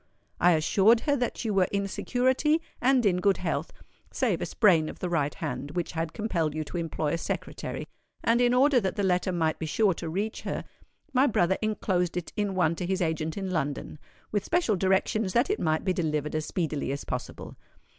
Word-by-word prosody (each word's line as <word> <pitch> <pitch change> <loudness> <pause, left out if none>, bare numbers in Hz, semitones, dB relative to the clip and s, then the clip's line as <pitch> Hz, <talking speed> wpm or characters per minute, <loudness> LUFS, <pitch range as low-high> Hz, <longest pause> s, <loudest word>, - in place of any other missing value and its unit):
I 175 +1 +5
assured 195 +8 +4
her 285 -2 +1
that 245 -1 -2
you 215 - 0
were 190 -2 +3
in 200 0 0
security 260 - +1 0.2
and 255 -1 +3
in 185 -3 +3
good 195 +1 +2
health, - - -2 0.4
save - - 0
a - - -2
sprain 170 -8 +3
of - - -8
the 180 - -3
right 150 -4 0
hand 150 -1 -5
which 175 -2 -2
had 165 -1 -3
compelled 170 -9 -1
you 155 - -1
to 155 +4 -6
employ 160 -2 -2
a 165 - -1
secretary; - - -4 0.4
and 235 +1 +3
in 245 0 +4
order 260 +1 +5
that 195 -4 -2
the 205 - -1
letter 185 0 +1
might 160 -3 0
be 160 - -3
sure 200 +4 +2
to 165 0 -6
reach 205 +6 -3
her, - - -3 0.5
my 260 +2 +4
brother 190 -5 +2
enclosed 185 -5 0
it 175 - -5
in 205 -2 -1
one 170 -3 +2
to 180 - -3
his 190 0 0
agent 160 -1 -1
in 190 -2 -3
London, 145 -2 -3 0.3
with 205 -2 0
special 335 - +1
directions 190 +2 +1
that 245 +11 +3
it 415 - -1
might 155 +1 0
be 185 - +2
delivered 150 -4 -1
as 155 0 -2
speedily 155 -6 -2
as 140 - -4
possible. - - -6
185 Hz, 205 wpm, -27 LUFS, 160-215 Hz, 0.5 s, I